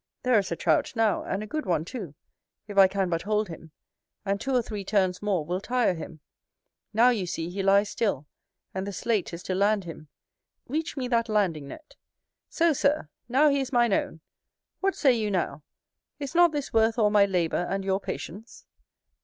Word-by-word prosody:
there 250 -4 +4
is 195 - -4
a - - 0
Trout 160 -3 +1
now, 225 -3 +2
and 195 +2 -3
a - - -5
good 310 +8 -4
one 165 -3 +1
too, 185 - -7 0.5
if 205 - -8
I 195 -1 +8
can 195 0 -1
but 165 -1 -1
hold 210 0 0
him; 165 -1 -10 0.6
and 200 0 -1
two 270 -1 -1
or 245 - +3
three 210 -3 -5
turns 190 -2 +1
more 195 -7 0
will 180 +4 -2
tire 245 -3 +1
him. 160 -2 -9 0.7
Now 230 +3 +5
you 205 -7 -2
see 165 0 -4
he 195 +2 -3
lies 200 +1 +3
still, 200 - -1 0.5
and 190 +1 -3
the 200 - -4
sleight 215 0 -1
is 170 +1 -8
to 185 - -2
land 200 +2 +2
him: 165 -3 -9 0.6
reach 310 +3 -3
me 255 -2 -2
that 230 -2 +1
landing 180 -9 0
net. 310 - -12 0.5
So, 335 -1 +2
Sir, 280 - +1 0.2
now 285 +5 +5
he 280 0 +2
is 265 0 -3
mine 240 -4 +3
own: 160 -4 -1 0.6
what 390 0 0
say 270 -4 +4
you 220 -3 -1
now, 180 -5 -2 0.6
is 280 -1 -6
not 345 -1 +5
this 290 -2 -4
worth 225 0 +3
all 210 -3 +3
my 205 -1 +5
labour 175 -2 0
and 195 0 -2
your 190 0 +1
patience? 205 +3 -8
205 Hz, 200 wpm, -27 LUFS, 185-240 Hz, 0.7 s, I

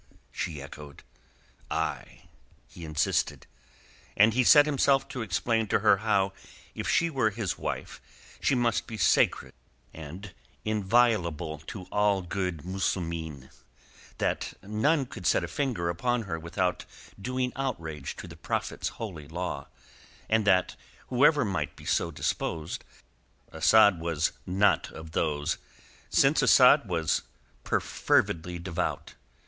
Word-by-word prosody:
she 80 -5 -4
echoed. 70 +1 -11 0.7
"Ay," - - -3 0.4
he 85 - -10
insisted. 75 -1 0 0.7
And 110 +2 +6
he 130 +2 +3
set 145 +4 +8
himself 140 -2 +2
to 125 - -5
explain 110 +3 0
to - - +1
her - - +5
how 95 0 +1 0.4
if - - -4
she 170 0 +2
were 130 -7 +2
his 105 -3 -3
wife - - -5 0.4
she 140 - +2
must 120 -2 0
be 110 - -6
sacred 90 -4 +2 0.4
and 90 +5 -9 0.3
inviolable 100 -7 +1
to 95 - -7
all 105 -2 +2
good 90 -3 -3
Muslimeen, 85 -7 -3 0.7
that - - -1
none 135 +9 +1
could 125 -8 -6
set - - +3
a - - -3
finger 110 - -2
upon 120 +8 0
her 85 -5 -4
without 90 +2 -2 0.4
doing 125 +3 -2
outrage 85 - -4
to - - -9
the - - -11
Prophet's - - -3
holy 85 -10 -6
law, 80 -4 -4 0.6
and 110 -1 +2
that, 95 -2 +3 0.3
whoever 145 +2 +4
might 85 -8 -2
be - - -14
so 85 - +1
disposed, 80 0 -3 0.7
Asad 100 +3 +5
was 85 -1 0 0.2
not 95 +3 +2
of 80 0 -9
those, 75 0 -1 0.5
since 140 +3 +4
Asad 130 -1 +6
was 80 -3 +1 0.4
perfervidly 85 +1 0
devout. 85 0 -3
95 Hz, 125 wpm, -28 LUFS, 80-115 Hz, 0.7 s, set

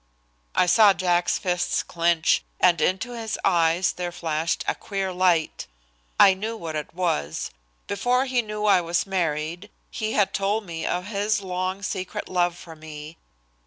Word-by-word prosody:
I - - +4
saw 205 +3 +6
Jack's 175 -2 +1
fists 180 -1 0
clench, 170 -1 +1 0.2
and 175 -3 +4
into 190 +9 0
his 225 -2 -4
eyes 170 -1 +3
there 175 -1 -4
flashed 165 -1 -2
a - - +2
queer 195 -2 -4
light. 180 -3 +1 0.5
I 195 - +8
knew 220 +4 -4
what 165 -5 -6
it 155 +1 -5
was. 80 - -1 0.3
Before 245 +6 +1
he 255 -2 +1
knew 210 -1 -4
I 200 -3 +5
was 170 0 0
married 170 0 -2 0.2
he 220 0 -3
had 205 -2 +2
told 205 +2 0
me 165 -2 -5
of 180 +1 -1
his 205 0 -1
long 185 +1 -3
secret 185 -1 -4
love 175 -1 +1
for 165 -2 -11
me. 155 0 -10
180 Hz, 160 wpm, -24 LUFS, 170-200 Hz, 0.5 s, I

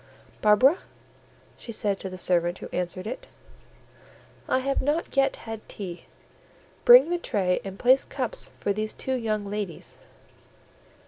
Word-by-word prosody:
"Barbara," 240 - +5 0.8
she 235 - -8
said 205 -3 -2
to 190 - -6
the 185 - -8
servant 175 -1 +2
who - - -8
answered 180 +1 -3
it, 245 +4 -6 1.2
"I - - +3
have 275 +1 0
not 295 +4 -1
yet 275 0 +3
had 225 -1 -8
tea; 180 -4 -7 0.8
bring - - +8
the 350 - 0
tray 190 - 0
and 195 0 -7
place 255 +4 +4
cups 255 -4 -4
for 200 - 0
these 215 +1 -3
two 265 - -2
young 215 -4 -1
ladies." 200 -4 -6
215 Hz, 140 wpm, -26 LUFS, 195-260 Hz, 1.2 s, bring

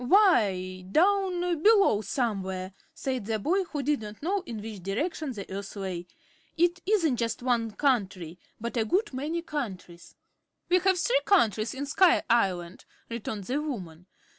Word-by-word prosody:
"Why, 200 - +3
down 375 - +3 0.2
below, 400 - +5
somewhere," 190 -6 -2 0.2
said 265 -8 -3
the 220 -1 0
boy, 365 - +1
who 295 -4 -4
did 290 -2 +1
not 210 +3 -9
know 390 +4 0
in 225 -2 -5
which 210 -2 -7
direction 280 - -2
the 200 -4 -7
Earth 200 +1 -6
lay. 185 -3 -4 0.5
"It 345 +2 +2
isn't 335 - +2
just 230 +1 -2
one 235 -3 +1
country, 190 - 0 0.2
but 235 +2 -4
a 225 - +3
good 375 - 0
many 310 +6 -3
countries." 190 - -6 0.5
"We 365 +1 +5
have 375 +1 +2
three - - +2
countries 225 - +2
in 280 +2 -3
Sky 350 +5 +4
Island," 185 -6 0 0.2
returned 220 -3 -4
the 265 +9 -1
woman. 180 - -6
240 Hz, 155 wpm, -28 LUFS, -, 0.5 s, below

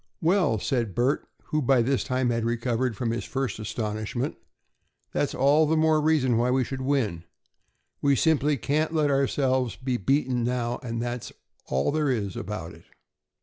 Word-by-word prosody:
"Well," 175 - +2
said 115 -2 -1
Bert, 130 +5 +1 0.2
who 155 - +1
by 130 -2 +3
this 135 +2 +1
time 125 -1 0
had 115 -1 -1
recovered 120 0 -1
from 115 0 -1
his 120 - -2
first 135 -4 -3
astonishment, 110 +3 -3 0.8
"that's - - -1
all 145 +4 +4
the 160 +1 +2
more 155 -1 +3
reason 145 -6 +2
why 120 +2 +2
we 130 +1 +2
should 130 +2 -5
win. 130 -11 0 0.8
We 140 -1 +3
simply 150 0 +2
can't 155 +6 0
let 150 -2 +2
ourselves 130 -3 +1
be 130 -1 -2
beaten 125 +2 +1
now, 120 0 -1
that's 120 0 -4 0.4
all 65 - +1
there 150 -1 +1
is 105 -7 -1
about 90 -5 -5
it." - - -16
125 Hz, 160 wpm, -26 LUFS, 115-140 Hz, 0.8 s, all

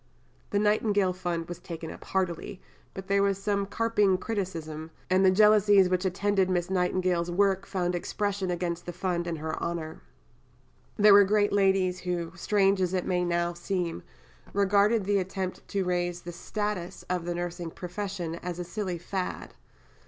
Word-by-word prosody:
" - - -35
The 205 - 0
Nightingale 205 -2 +2
Fund 175 -2 -3
was 175 - -7
taken 165 -1 -7
up - - -11
heartily, 185 +1 -2 0.4
but 190 - -6
there 200 0 +3
was 200 -1 +2
some 200 0 -1
carping 210 -3 +2
criticism, 165 -7 -4 0.2
and 185 +1 +4
the 190 - +7
jealousies 205 -1 +5
which 185 +1 0
attended 195 0 +1
Miss 180 0 0
Nightingale's 180 -1 +1
work 195 +1 +1
found 180 -2 -1
expression 195 +2 -2
against 175 -1 -3
the 175 - -4
Fund 175 -1 -2
in 170 - -2
her 155 0 -4
honour. 165 -2 -4 1.0
There 210 -1 +7
were 200 0 +9
great 205 +1 +2
ladies 190 -2 +2
who, 175 -2 -3
strange 195 +1 +2
as 185 0 0
it 180 - -1
may 180 -1 +1
now 175 0 0
seem, 175 - -3 0.5
regarded 200 +2 +3
the 200 0 +2
attempt 190 0 -4
to 195 -2 -1
raise 175 -1 -1
the 175 - -7
status 205 0 -4
of 180 -2 -2
the 175 0 -2
nursing 175 -1 -4
profession 180 -1 -5
as 175 0 -5
a 180 - -3
silly 185 0 -4
fad. 180 +2 -4
185 Hz, 165 wpm, -28 LUFS, 175-200 Hz, 1.0 s, were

